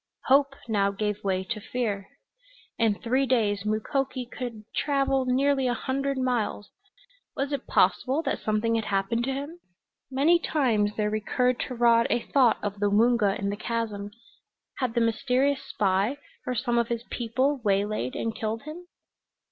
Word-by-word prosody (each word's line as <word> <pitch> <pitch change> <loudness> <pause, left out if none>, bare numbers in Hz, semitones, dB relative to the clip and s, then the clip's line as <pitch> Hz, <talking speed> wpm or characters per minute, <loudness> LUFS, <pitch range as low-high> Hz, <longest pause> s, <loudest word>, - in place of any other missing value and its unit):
Hope 275 +1 +4
now 200 -3 +2
gave 210 +1 -3
way 190 -1 0
to 215 +3 -5
fear. 205 -4 -3 0.7
In 225 -3 +3
three 260 +5 0
days 210 -6 +1
Mukoki 255 +4 -1
could 240 -3 -7
travel 275 -2 +1
nearly 270 +1 +2
a 245 - +1
hundred 275 +3 -2
miles. 245 -5 -1 0.6
Was 275 +1 -2
it 280 -2 -3
possible 275 +5 +2
that - - -1
something 215 +1 0
had 225 -1 0
happened 200 +4 0
to 270 - -1
him? 290 +6 -6 0.5
Many 290 +6 +4
times 225 -11 +1
there 210 -1 0
recurred 250 +3 0
to 255 - -6
Rod 235 -1 +4
a 240 - +1
thought 255 -5 +4
of 205 -1 -3
the 205 0 +2
Woonga 215 -1 +3
in 200 0 -2
the - - -2
chasm. 215 -2 -3 0.7
Had 250 -3 -1
the 235 - +3
mysterious 255 +4 +1
spy, 200 +6 0 0.3
or 250 - -1
some 240 0 +1
of 235 - +1
his 235 -1 -3
people, 255 +4 0
waylaid 200 - 0
and 225 -1 -2
killed 220 0 -3
him? 325 +4 -9
235 Hz, 160 wpm, -27 LUFS, 210-265 Hz, 0.7 s, Hope